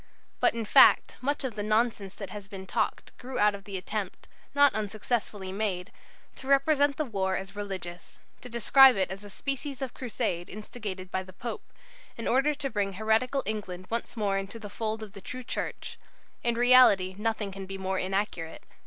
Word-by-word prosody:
"But, - - +3
in 230 -1 -2
fact, - - +6
much 285 +3 0
of 260 -3 -2
the 210 - -4
nonsense 215 -2 0
that 200 - -7
has 205 -2 -8
been 195 -2 -8
talked - - -2
grew 255 +1 -6
out 210 0 +4
of 200 -1 -9
the 200 -2 -5
attempt, 195 +1 -5 0.3
not 285 -1 +6
unsuccessfully 210 -2 -2
made, 195 -1 -2 0.5
to 265 - -9
represent 280 0 +3
the 305 - 0
war 190 -5 -1
as 195 +1 -7
religious; 185 -4 -7 0.2
to 250 - -9
describe 255 +3 +7
it 190 -2 0
as 195 +2 -7
a 205 - -10
species 275 +5 -3
of 265 -3 -4
crusade 180 -8 -3
instigated 200 -3 -7
by 190 - 0
the 185 0 -12
Pope, 235 +6 -7 0.5
in 230 - -4
order 275 +4 +3
to 280 -1 -3
bring 200 -2 -1
heretical 220 +7 +1
England 195 -4 -4
once 235 +1 -3
more 200 -2 +1
into 195 +3 -6
the 210 -3 -9
fold 220 0 -3
of 205 -2 -10
the 200 - -10
true 255 +6 -7
Church. - - -5 0.4
In 235 -1 +1
reality 240 -6 +6
nothing 220 -2 -1
can 195 0 -7
be 195 0 -5
more 190 0 -2
inaccurate. 185 -4 -2
210 Hz, 190 wpm, -28 LUFS, 195-245 Hz, 0.5 s, describe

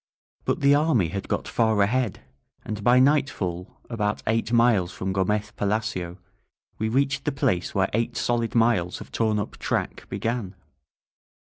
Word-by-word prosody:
But - - 0
the 140 0 +5
army 145 - +3
had 100 +2 -5
got - - -2
far 110 -2 +1
ahead, 120 +1 0 0.4
and 105 -1 -5
by 120 +3 +5
nightfall, 130 - +1
about 105 -3 -2
eight 115 +1 0
miles 115 -7 +3
from 95 +1 -3
Gomez 105 +2 0
Pa - - -6
lacio, 100 -4 -2 0.6
we 110 +1 0
reached 140 +3 +1
the 150 - +1
place 130 -11 -1
where 100 0 +1
eight 115 +2 -1
solid 120 -1 0
miles 115 -7 +2
of - - -11
torn 110 -2 +1
up 105 +1 -4
track - - -3
began. 115 -5 -3
110 Hz, 155 wpm, -25 LUFS, 100-120 Hz, 0.6 s, the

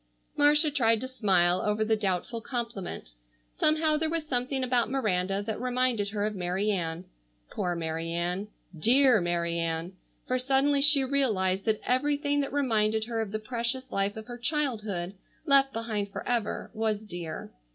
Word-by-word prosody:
Marcia 295 +1 +4
tried 230 -5 +3
to 260 - -5
smile 185 -8 +2
over 210 +1 0
the 220 0 +2
doubtful 210 +2 -2
compliment. 230 - -5 0.4
Somehow 310 0 +2
there 315 +1 0
was 330 -1 -2
something 260 -1 -1
about 245 -2 +1
Miranda 195 -6 0
that 220 +1 -4
reminded 250 -4 0
her 205 0 -2
of 215 - -2
Mary 190 +2 -1
Ann. 170 -2 -3 0.5
Poor 175 -1 -2
Mary 165 0 -3
Ann! 175 +4 -2 0.3
Dear 245 - +5
Mary 170 -1 -1
Ann! 165 +2 -2 0.3
For 255 0 0
suddenly 275 +2 +2
she 290 -1 +7
realized 210 -9 0
that 215 -1 0
everything 285 +2 +1
that 275 - -3
reminded 220 -6 +1
her 230 -1 -2
of 215 -3 -4
the 215 - -1
precious 235 +3 -3
life 200 +2 -1
of 220 - -7
her 245 0 -9
childhood, 220 - -2 0.3
left 275 -1 +4
behind 215 -4 -3
forever, 235 0 -3
was 220 -1 -1
dear. 175 -6 -7
220 Hz, 160 wpm, -28 LUFS, 190-260 Hz, 0.5 s, she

